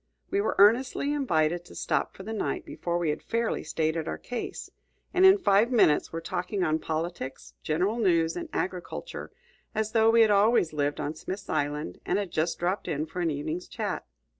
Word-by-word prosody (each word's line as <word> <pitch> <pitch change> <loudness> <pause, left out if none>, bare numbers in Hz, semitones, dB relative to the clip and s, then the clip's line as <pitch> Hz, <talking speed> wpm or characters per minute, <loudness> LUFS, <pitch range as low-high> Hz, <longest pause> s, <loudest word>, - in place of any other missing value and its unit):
We 395 - +2
were - - -1
earnestly 250 +7 +4
invited 175 - +1
to - - -13
stop - - -1
for 190 - -8
the 220 +3 -5
night 215 - -2
before 170 0 -3
we 170 -3 +1
had 150 - -4
fairly 230 0 -1
stated 160 0 -1
our - - -3
case, 245 -2 -6 0.4
and 370 +1 +7
in 380 +1 +7
five 230 - +3
minutes 210 -11 +4
were 165 - -3
talking 180 +3 -2
on 160 -2 +1
politics, 160 -4 -4
general 185 +9 0
news, 170 -6 +2
and 340 -2 -5
agriculture, 185 - -4 0.5
as 220 0 -1
though 225 -1 +4
we 230 0 +6
had 220 -2 +5
always 205 -4 +4
lived 145 -1 -1
on 145 - -2
Smith's 190 +5 -7
Island 145 - -2
and - - 0
had 200 -3 -3
just 160 +2 0
dropped 185 +3 -1
in 150 +1 -1
for 160 +3 -7
an 170 - +1
evening's 155 +4 -3
chat. - - -3
180 Hz, 190 wpm, -28 LUFS, 160-225 Hz, 0.5 s, and